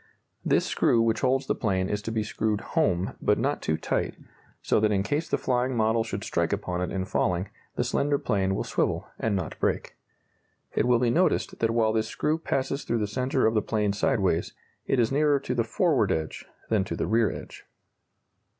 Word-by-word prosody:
This - - +2
screw 115 - +2
which 115 -1 +2
holds 130 +1 +2
the - - +1
plane 95 -4 0
is 105 +1 -2
to 110 - -4
be 110 -1 0
screwed 105 0 -1
"home" 90 +1 +1
but - - +3
not - - -1
too 80 - 0
tight, - - -2 0.4
so - - +1
that 105 0 +2
in 95 -1 +1
case 145 +9 -1
the - - +1
flying 125 0 0
model 110 +1 +2
should 110 - -5
strike - - 0
upon 90 0 -2
it 90 - -2
in 95 -1 -2
falling, 90 0 0 0.3
the - - +1
slender 145 0 +1
plane 95 -7 0
will - - -1
swivel, - - -1
and 110 -3 0
not 90 -5 -4
break. - - -1 0.8
It 120 - +1
will 125 -1 +5
be 120 0 +2
noticed 180 +8 +1
that 115 - +2
while 115 -1 +2
this 110 -1 0
screw 155 +2 -1
passes 140 -2 -2
through 115 - -1
the 105 - 0
centre 130 +6 0
of 110 - +3
the 110 - +2
plane 105 -2 0
sideways, 100 -6 +1 0.3
it 135 - +2
is 115 0 +2
nearer 145 0 +3
to 125 - -2
the 120 -2 +1
forward 135 - +2
edge 80 -1 -3 0.2
than 110 -4 +2
to - - -4
the - - -1
rear 110 0 +3
edge. - - -9
110 Hz, 205 wpm, -27 LUFS, 100-125 Hz, 0.8 s, will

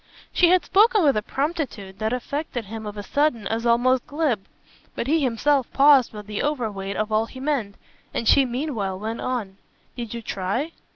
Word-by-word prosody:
She 350 - +5
had 365 0 +4
spoken 425 +1 +4
with 280 -3 +4
a 215 - +1
promptitude 265 - -3
that 220 0 -1
affected 250 -1 -3
him 220 +1 -7
of 210 0 -7
a 205 - -5
sudden 265 -2 0
as 230 +1 -1
almost 245 +2 +3
glib; 285 -10 -1 0.5
but - - -2
he 315 +5 +2
himself 265 +1 +1
paused 275 -3 +6
with 210 -1 -9
the 210 0 -4
overweight 215 -9 -2
of 215 0 -1
all 215 +1 +2
he 260 - -11
meant, 260 -8 -1 0.4
and 230 - -3
she 275 - +6
meanwhile 240 -7 -2
went 220 +3 -4
on. 220 -7 -3 0.4
"Did 235 -2 -5
you 235 - -6
try?" 205 - -2
240 Hz, 185 wpm, -24 LUFS, 215-285 Hz, 0.5 s, paused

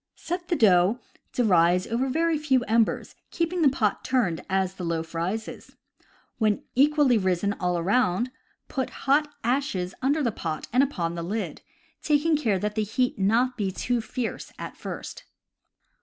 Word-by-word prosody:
— - - -61
Set 350 0 -2
the 345 - +1
dough 195 - +4 0.3
to 250 - 0
rise 180 -3 +4
over 240 +4 -1
a - - -2
very 325 +4 +1
few 275 -5 +2
embers, 225 0 +1 0.2
keeping 340 +1 -1
the 295 - +6
pot 220 -6 0
turned 230 -11 0
as 190 -1 +1
the 185 - -8
loaf 165 -1 -3
rises. 185 +7 -4 0.6
When 215 -2 +1
equally 280 -2 +4
risen 190 +1 0
all 180 -1 0
around, 200 +5 +1 0.4
put 265 -3 -2 0.2
hot 290 +2 +3
ashes 230 -8 -1
under 285 +4 +1
the 235 - +1
pot 160 -6 -4
and 255 - +5
upon 180 -12 -1
the 170 - -4
lid, 185 -2 -4 0.4
taking 305 +2 +2
care 225 -10 +1
that 210 +2 -2
the 215 - 0
heat 250 +4 0
be - - -5
not 240 +5 +2 0.2
too 245 -1 0
fierce 245 +1 -5
at - - -7
first. - - -7
225 Hz, 170 wpm, -26 LUFS, 185-270 Hz, 0.6 s, the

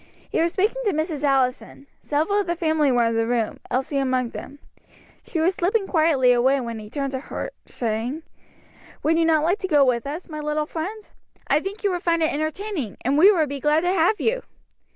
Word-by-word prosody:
He - - +1
was 335 0 +1
speaking 425 +6 0
to 410 - +2
Mrs. 310 -1 -2
Allison. 270 -1 0 0.2
Several 315 +8 0
of 400 - -2
the 345 - 0
family 315 -4 +2
were 240 -2 +3
in 230 0 0
the 225 0 +1
room, 235 -3 -1
Elsie 265 +3 -1
among 255 -3 0
them. 285 - -9 0.7
She 330 - -4
was 340 +4 +2
slipping 390 +4 0
quietly 310 -8 +3
away, 260 +3 +3
when 235 -3 -5
he 210 -1 -10
turned 275 +2 -3
toward 260 0 -4
her, - - -5 0.2
saying: 240 +6 -3 0.8
"Would 325 +2 +2
you 330 - +3
not 315 -2 +3
like 355 +6 +1
to 380 - -3
go 290 -5 +4
with 245 -1 0
us, 310 +5 -6
my 305 -2 -6
little 300 0 -1
friend? 390 +8 -6 0.4
I 290 - +3
think 390 +6 -7
you 400 - +2
would 355 -1 -2
find 335 -1 +1
it 315 - +1
entertaining, 310 - -3
and 270 +3 +2
we 365 +8 +7
would 325 -6 +2
be 280 0 -4
glad 300 +3 +2
to 355 +2 +1
have 380 +4 +2
you." - - 0
305 Hz, 215 wpm, -23 LUFS, 265-350 Hz, 0.8 s, we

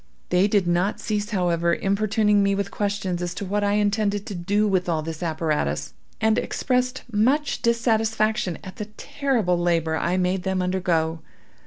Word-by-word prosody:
They 180 +3 +4
did 205 -3 +2
not 175 +4 +1
cease, 210 -1 -2
however, 170 -4 +1
importuning 210 +1 +2
me 200 0 +2
with 200 0 -2
questions 200 -4 -2
as 175 0 -3
to 200 - -4
what 205 +2 -1
I 205 0 +2
intended 205 -1 +1
to - - -6
do 205 +4 +1
with 185 -3 +1
all 160 -2 0
this 160 +1 -6
apparatus, 150 - -1 0.3
and 220 +1 +3
expressed 250 0 -1
much 265 +8 +1
dissatisfaction 220 -4 +1
at 190 -2 -10
the 210 - -4
terrible 230 -11 0
labor 165 -2 +1
I 175 +3 0
made 185 0 +1
them 190 +1 -1
undergo. 175 -3 0
195 Hz, 165 wpm, -24 LUFS, 175-215 Hz, 0.3 s, They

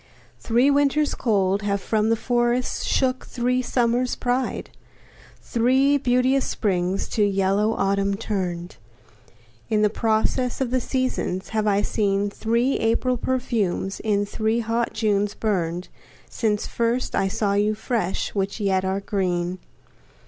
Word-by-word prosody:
Three 245 +5 +3
Winters 285 +1 +2
cold 200 -4 +1
Have 200 -1 0
from 215 +2 0
the 230 - +4
forests 240 +1 0
shook 255 -1 0
three 250 +1 0
Summers' 245 0 +1
pride; 250 +1 -2 0.7
Three 265 +4 +3
beauteous 255 +1 +2
springs 185 -2 -1
to 215 - +1
yellow 200 +2 +2
Autumn 200 0 +1
turn'd 180 -5 -3 0.9
In 215 -1 +3
process 225 +3 0
of 260 -3 -1
the 255 0 +1
seasons 255 -8 -2
have 215 -1 -1
I 205 0 +2
seen, 200 -1 0
Three 235 +5 0
April 230 +3 +1
perfumes 230 -7 -1
in 205 -2 0
three 220 +3 -1
hot 230 +1 -1
Junes 205 -2 0
burn'd, 180 -5 -1 0.4
Since 210 -3 -1
first 235 +2 -1
I 195 - +2
saw 205 0 0
you 210 +1 +2
fresh, 220 -4 -2
which 195 +2 -2
yet 190 -2 +1
are 190 +1 -1
green. 185 -2 -1
220 Hz, 130 wpm, -23 LUFS, 200-245 Hz, 0.9 s, the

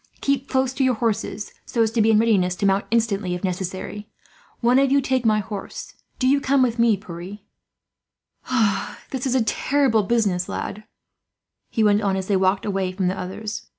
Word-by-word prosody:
Keep 275 -1 -1
close 260 -1 +1
to 270 - 0
your 255 -2 +3
horses, 220 -2 -2
so 230 - 0
as 220 - 0
to 230 -1 +1
be 220 - +4
in 220 - +5
readiness 200 -5 +2
to 200 - -2
mount 195 0 +2
instantly, 210 -5 0
if 180 - -7
necessary. 190 +3 -4 0.5
One 245 +2 +4
of 275 -1 +2
you 280 - +5
take 260 -3 0
my 215 -1 +4
horse. 200 -1 -7 0.2
"Do 255 - +1
you 280 +2 +3
come 275 -1 +3
with 235 -2 0
me, 230 -3 +4
Pierre. 180 0 -8 1.7
"This 265 0 -2
is 260 - 0
a 255 - +3
terrible 260 0 +2
business, 200 -4 0
lad," 215 +2 -5 0.8
he 225 - 0
went 205 0 +4
on, 200 -2 +1
as 190 -1 -2
they 200 - +1
walked 190 +1 +1
away 195 -2 -1
from 185 -1 -1
the 185 - -2
others. 210 +4 -6
215 Hz, 190 wpm, -23 LUFS, 195-245 Hz, 1.7 s, in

